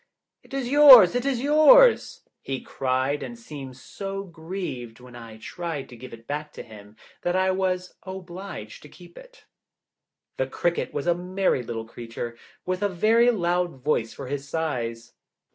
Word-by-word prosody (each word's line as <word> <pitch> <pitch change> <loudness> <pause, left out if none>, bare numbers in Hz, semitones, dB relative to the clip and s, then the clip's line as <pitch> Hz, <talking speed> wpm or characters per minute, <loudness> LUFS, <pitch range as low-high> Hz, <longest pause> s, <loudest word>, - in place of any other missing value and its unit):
"It - - -23
is 270 -2 -3
yours, 265 -8 +9
it 245 +2 -1
is 255 -4 0
yours!" 310 - +5 0.2
he 135 -1 -4
cried, 130 +2 -2
and 240 - -7
seemed 140 - -10
so 195 +7 -6
grieved 165 - -7
when 125 -1 -14
I 115 -2 -11
tried 165 +4 -6
to 125 - -11
give 125 +2 -11
it 115 0 -12
back 150 +2 -5
to - - -8
him 105 -1 -14 0.3
that 175 +1 -1
I 185 0 +2
was 185 -1 -2
obliged 185 - -9
to 150 - -14
keep 175 +1 -16
it. - - -16 0.9
The 130 - -1
cricket 170 +5 -2
was 145 - -4
a 175 - +3
merry 180 -4 -1
little 115 -1 -6
creature, 115 +1 -7 0.3
with 185 +1 -2
a 205 - +1
very 225 +6 +3
loud 175 - -1
voice 120 -6 0
for 140 - -9
his 140 +1 -5
size. 120 -8 -3
170 Hz, 165 wpm, -25 LUFS, 130-195 Hz, 0.9 s, yours